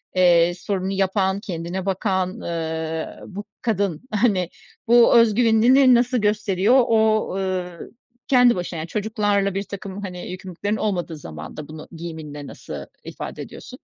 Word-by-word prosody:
eee, 175 -1 +5
sporunu 190 +1 -3
yapan, 195 0 +1
kendine 180 -2 -5
bakan, 190 -1 0
ııı, 160 -1 -4
bu 205 +1 -7 0.2
kadın, 200 -7 -1
hani, 205 -5 +2 0.4
bu 240 0 +6
özgüvenini 230 +1 +4
ne 265 -2 +7
nasıl 245 +1 +3
gösteriyor? 210 0 +2
O, 220 -1 +3
ııı, 185 -3 -4 0.4
kendi 250 -2 +5
başına, 180 -1 -4
yani, 160 +1 -4
çocuklarla 205 -2 0
birtakım, 195 0 -5
hani, 180 -3 -6
yükümlülüklerin 190 +3 -4
olmadığı 175 -7 -2
zamanda 80 - -8
bunu 155 0 -10
giyiminde 155 -4 -7
nasıl - - -8 0.2
ifade - - -7
ediyorsun? - - -10
190 Hz, 130 wpm, -22 LUFS, 175-215 Hz, 0.4 s, ne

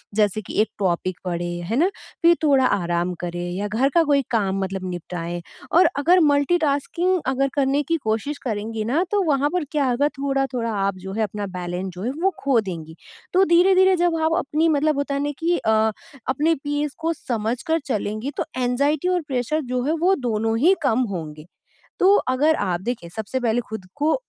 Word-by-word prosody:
जैसे 210 0 +2
कि 195 - -9
एक 220 - 0
टॉपिक 185 -1 -1
पढ़ें, 175 -1 -3
है 200 +7 -2
ना? 345 +6 +4 0.3
फिर 340 +1 +6
थोड़ा 275 -4 +4
आराम 175 -4 0
करें 175 0 -4
या 200 +3 -2
घर 230 +6 +1
का 335 - +6
कोई 285 -2 +3
काम 195 -4 +1
मतलब 190 0 -4
निपटाएँ 175 0 -5 0.3
और 345 0 +6
अगर 350 +6 +5
मल्टीटास्किंग 315 +4 +1
अगर 270 +1 +1
करने 280 +1 +1
की 330 +4 0
कोशिश 220 +7 -1
करेंगी 220 0 -3
ना, 285 +10 +1
तो 410 -1 +2
वहाँ 290 -3 +2
पर 360 -2 +1
क्या 285 -4 +1
होगा, 255 +4 +2
थोड़ा-थोड़ा 270 -4 -1 0.2
आप 200 - -1
जो 190 - -5
है, 220 +2 0
अपना 205 0 -3
बैलेंस 180 +1 -4
जो 180 - -7
है, 245 - -1
वो 385 - +4
खो 275 -4 +3
देंगी। 165 -5 -7 0.4
तो 375 +2 +5
धीरे-धीरे 375 +2 +5
जब 345 -1 +1
आप 320 +1 +2
अपनी 310 0 +1
मतलब 305 0 +2
होता 285 0 -1
है - - -1
ना 290 - -1
कि 345 +1 +1
अ, 220 - 0 0.6
अपने 300 +5 +2
पीस 290 0 -2
को 330 +1 0
समझकर 245 +5 -2
चलेंगी, 215 +1 -2
तो - - 0
एंग्यज़ायटी 280 +6 +1
और 360 -1 +1
प्रेशर 270 +3 -1
जो 250 0 0
है, 295 - +1
वो 345 +4 +2
दोनों 225 - -1
ही 350 +9 +5
कम 230 +3 +2
होंगे। 155 -3 -6 0.5
तो 390 +2 +6 0.2
अगर 305 +4 +3
आप 175 0 -1
देखिए, 220 -5 -4
सबसे 220 +4 -3
पहले 235 0 +1
खुद 220 -4 -7
को 300 +2 +2
260 Hz, 195 wpm, -22 LUFS, 205-310 Hz, 0.6 s, फिर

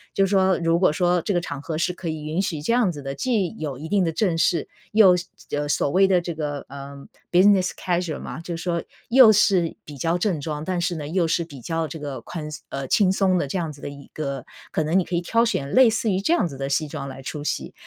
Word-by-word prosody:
就 195 - +4
说 190 -1 +3
如 165 0 +1
果 185 - +4
说 175 +2 +2
这 195 +2 -1
个 - - +3
场 145 -5 -6
合 155 +1 -4
是 170 +2 0
可 175 -2 -5
以 155 -1 -4
允 155 +4 -1
许 165 -6 -2
这 230 - +1
样 240 -7 +3
子 145 -4 -8
的， 135 0 -4
既 205 - -1
有 145 -4 -4
一 155 +4 -7
定 200 0 +2
的 165 - 0
正 175 0 0
式， 165 -1 +2 0.2
又 210 -4 +7
是 175 - -5 0.3
呃， 145 0 -1
所 145 - +1
谓 190 +4 +5
的 185 -2 +4
这 175 0 -4
个， 145 -3 -4
呃， 140 0 -10 0.2
business 185 0 +5
casual 175 -3 -1
嘛， 125 - -7
就 170 0 -5
说， 170 0 -2 0.3
又 245 -2 +8
是 190 -5 +3
比 145 -2 -10
较 165 +6 0
正 180 -4 -1
装， 150 0 -4
但 180 -1 -1
是 175 0 -1
呢， 150 -3 -5
又 170 +2 +1
是 170 +1 0
比 140 -6 -11
较 165 +4 -2
这 160 - -8
个 145 -2 -5
宽 155 -3 -6
松 150 - -8
呃， 135 -1 -4
轻 190 +4 +3
松 190 -1 +2
的 145 - -1
这 165 - -3
样 165 -3 -2
子 140 -1 -14
的 - - -5
一 140 -1 -12
个 140 -4 -4 0.3
可 155 - 0
能 160 +5 +1
你 180 - -1
可 175 - -3
以 170 - +1
挑 230 +6 +2
选 140 -12 -1
类 255 -2 +6
似 220 -1 0
于 185 - +1
这 205 +12 +1
样 345 - +2
子 140 -6 -6
的 135 0 -3
西 145 +2 0
装 140 - -5
来 135 0 -8
出 145 +3 -6
席。 - - -3
170 Hz, 325 characters per minute, -23 LUFS, 150-185 Hz, 0.3 s, 又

